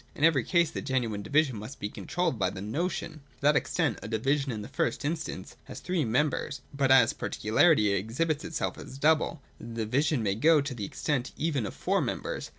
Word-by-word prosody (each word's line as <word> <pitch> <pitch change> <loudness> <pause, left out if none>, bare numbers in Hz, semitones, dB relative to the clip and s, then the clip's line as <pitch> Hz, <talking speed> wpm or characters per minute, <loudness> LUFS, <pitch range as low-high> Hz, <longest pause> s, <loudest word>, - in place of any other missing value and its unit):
In 145 - -4
every 155 -6 +5
case 170 +2 +2
the - - -4
genuine 120 -6 -1
division 145 +1 +1
must 110 +6 -8
be 105 - -2
controlled 155 +3 -2
by 95 -2 +2
the 95 - -8
notion. 155 - -2 0.2
To - - -31
that 145 +2 +4
extent - - 0
a - - -6
division, 135 +5 0
in 105 -3 -4
the - - -7
first 140 - -1
instance, 155 - -4
has - - -8
three 180 -5 -1
members: 135 +2 0
but 140 -1 +1
as 130 -4 +6
particularity 110 0 +3
exhibits 120 - -1
itself 165 - -3
as 135 - -9
double, 155 0 +2 0.2
the 115 -1 -4
division 135 +2 +1
may 100 -2 +1
go 155 +9 +4
to 140 -1 -3
the 105 -5 -4
extent 135 +4 -2
even 145 -9 -1
of - - -8
four - - +1
members. - - -3
135 Hz, 200 wpm, -28 LUFS, 110-155 Hz, 0.2 s, as